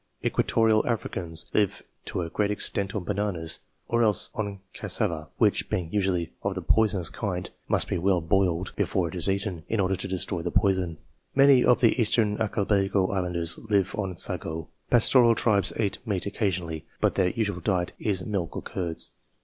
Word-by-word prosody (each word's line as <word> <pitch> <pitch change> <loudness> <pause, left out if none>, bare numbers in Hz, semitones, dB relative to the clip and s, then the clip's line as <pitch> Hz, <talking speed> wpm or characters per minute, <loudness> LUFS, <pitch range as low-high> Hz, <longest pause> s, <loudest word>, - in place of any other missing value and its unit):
Equatorial 110 -1 +2
Africans 85 -8 +1
live 105 -3 +1 0.2
to 90 - -3
a 85 - -5
great 105 -1 0
extent 100 -1 -2
on 100 - -2
bananas, 95 -4 -1 0.3
or 120 0 +1
else 110 -3 +1
on 100 -3 -4
cassava, 80 -2 -2
which, - - +2
being 85 -3 -3
usually 95 -5 0
of 100 -1 -2
the 95 - -3
poisonous 100 -4 +2
kind, 90 -2 -4 0.2
must - - +2
be - - -1
well 95 +1 +2
boiled 90 +1 +1
xvi - - -20
PREFATORY - - -14
CHAPTER - - +3
before 90 -2 -1
it 80 - -9
is 90 0 +4
eaten, 95 -4 -2
in 110 - 0
order 95 0 +1
to 95 +1 -5
destroy 90 -1 -2
the 85 - -2
poison. 95 -4 +1 0.4
Many 135 -2 +6
of 125 - +4
the 120 +1 +3
Eastern 110 -1 +2
Archipelago 100 -2 +1
islanders 90 -3 0
live 100 -4 0
on 95 -4 -3
sago. 80 -3 0 0.2
Pastoral 120 0 +5
tribes 100 -5 +2
eat 100 -4 -1
meat 100 -6 -2
occasionally, 90 -6 -2
but - - +2
their 90 -1 +2
usual 105 -3 -2
diet 90 -1 -1
is 95 -4 -1
milk 95 -6 -3
or - - -5
curds. 85 -3 -2
95 Hz, 180 wpm, -26 LUFS, 90-105 Hz, 0.4 s, Many